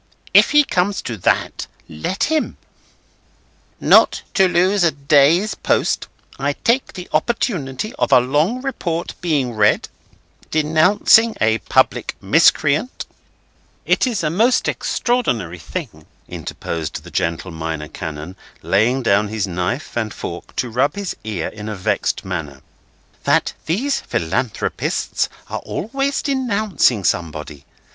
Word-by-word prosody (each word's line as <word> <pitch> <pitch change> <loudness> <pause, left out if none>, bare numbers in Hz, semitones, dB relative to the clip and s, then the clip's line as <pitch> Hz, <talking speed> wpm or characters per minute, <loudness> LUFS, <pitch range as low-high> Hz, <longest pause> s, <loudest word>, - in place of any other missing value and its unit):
if - - +7
he 295 0 +6
comes 190 -5 0
to 120 - -4
that, 90 - 0 0.2
let 80 - -3
him." 315 0 0 1.2
"'Not - - +5
to 190 -2 +4
lose 185 +2 +2
a 170 - +5
day's 150 +7 +3
post, - - 0 0.3
I 140 +1 0
take 235 - 0
the 180 -1 -8
opportunity 180 - -1
of - - +1
a 130 - +8
long 150 - 0
report 175 -11 -3
being 145 -8 0
read, 105 -1 +2 0.6
denouncing 170 +9 +4
a 110 +1 +2
public - - +1
miscreant—'" 155 - +2 0.8
"It - - +2
is 225 -8 -1
a 155 - 0
most 230 +8 +2
extraordinary 115 - -1
thing," 80 - -7 0.2
interposed 80 -2 -5
the - - -12
gentle 85 +2 -2
Minor 80 -1 -4
Canon, 80 +3 -7 0.3
laying 120 +7 +2
down 105 -1 +3
his 105 -1 -2
knife 90 - -3
and 110 -2 -1
fork - - -7
to 125 - -1
rub 135 +6 +1
his 200 -3 -4
ear 105 -7 -3
in 105 0 -8
a 105 - -4
vexed 95 - -1
manner, 80 -7 -5 0.6
"that - - +2
these 245 - 0
Philanthropists 95 +8 -2 0.2
are - - -4
always 275 - -2
denouncing 215 - +1
somebody. 75 -5 -3
140 Hz, 125 wpm, -19 LUFS, -, 1.2 s, a